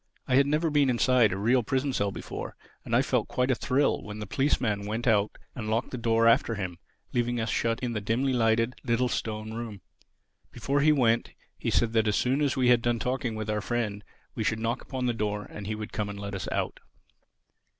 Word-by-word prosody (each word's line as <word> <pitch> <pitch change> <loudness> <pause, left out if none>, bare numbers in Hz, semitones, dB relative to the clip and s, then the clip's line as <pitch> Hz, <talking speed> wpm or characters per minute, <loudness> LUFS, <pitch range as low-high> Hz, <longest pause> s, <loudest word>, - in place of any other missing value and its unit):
I - - 0
had 140 +2 +5
never 155 +2 +1
been 145 -2 +3
inside 125 -3 +4
a 95 - -2
real 120 +6 +3
prison 135 +4 -1
cell 100 -3 0
before; - - -6 0.3
and - - -1
I - - +4
felt - - 0
quite 125 +1 0
a - - +4
thrill 135 +3 +1
when 105 0 -8
the 105 - -5
policeman 105 -4 0
went 110 +3 -3
out 105 -3 +2 0.2
and 110 -5 -5
locked 110 +1 0
the 125 - -4
door 115 0 +3
after 115 0 +4
him, 90 -4 -5 0.3
leaving 120 0 0
us 110 0 -1
shut 115 0 0
in 125 -2 -2
the 105 - -2
dimly 125 +6 0
lighted, 115 0 +2
little, 125 0 +1
stone 110 -1 -3
room. 110 -4 -6 0.7
Before 140 +1 0
he 155 +2 +5
went, 120 -5 +2 0.2
he - - -3
said 115 -1 +2
that 110 -1 +3
as 105 - +2
soon 130 +4 +1
as 140 -2 +1
we 125 -1 +3
had 120 -1 +5
done 120 0 +1
talking 125 -1 -2
with 110 0 -4
our 105 0 -1
friend 105 -3 -2 0.3
we - - -2
should 110 - +1
knock 115 +2 -1
upon 130 -1 -4
the 120 - +1
door 105 -2 -2
and 100 -1 -8
he 110 - -2
would 105 0 -7
come 105 -1 -2
and 100 0 -6
let 100 0 -5
us 95 - -4
out. - - -2
115 Hz, 225 wpm, -28 LUFS, 105-125 Hz, 0.7 s, had